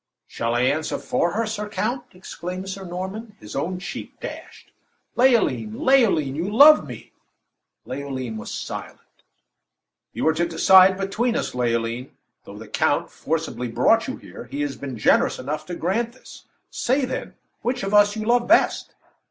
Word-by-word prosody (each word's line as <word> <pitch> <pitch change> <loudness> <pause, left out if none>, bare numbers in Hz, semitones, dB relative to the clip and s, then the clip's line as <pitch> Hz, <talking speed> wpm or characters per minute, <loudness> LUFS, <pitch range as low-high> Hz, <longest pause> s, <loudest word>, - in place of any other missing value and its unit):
"Shall 115 +1 -2
I 120 - +2
answer 145 +5 0
for 170 0 -1
her, 230 +2 0
Sir 210 -1 -4
Count?" 240 +4 -2
exclaimed 180 0 -7
Sir 190 0 -6
Norman, 190 +5 -6
his 105 0 -10
own 175 +6 -2
cheek 180 - -8
dashed. - - -9 0.4
"Leoline! 235 -3 +2
Leoline! 205 - +3
you 170 +6 -2
love 295 +7 +7
me!" - - -10 0.7
Leoline 130 -5 -5
was 110 - -7
silent. - - -6 1.1
"You - - -2
are 160 - +4
to 170 +2 0
decide 190 +2 +6
between 215 +5 -1
us, - - -2
Leoline. 120 0 -2 0.3
Though - - -10
the - - -10
count - - 0
forcibly 160 -5 -3
brought 175 - +2
you 260 - -4
here, - - -11
he 285 +2 -5
has 290 -1 -2
been 135 -4 -7
generous 110 - +3
enough 150 +4 -5
to 175 - -5
grant 225 +8 -1
this. 255 - -15 0.3
Say, 265 +2 0
then, 255 - -5 0.3
which 245 +1 -2
of 195 +1 -3
as 205 0 +5
you 215 -1 -4
love 240 +1 +2
best." 335 - +2
190 Hz, 160 wpm, -23 LUFS, 145-230 Hz, 1.1 s, love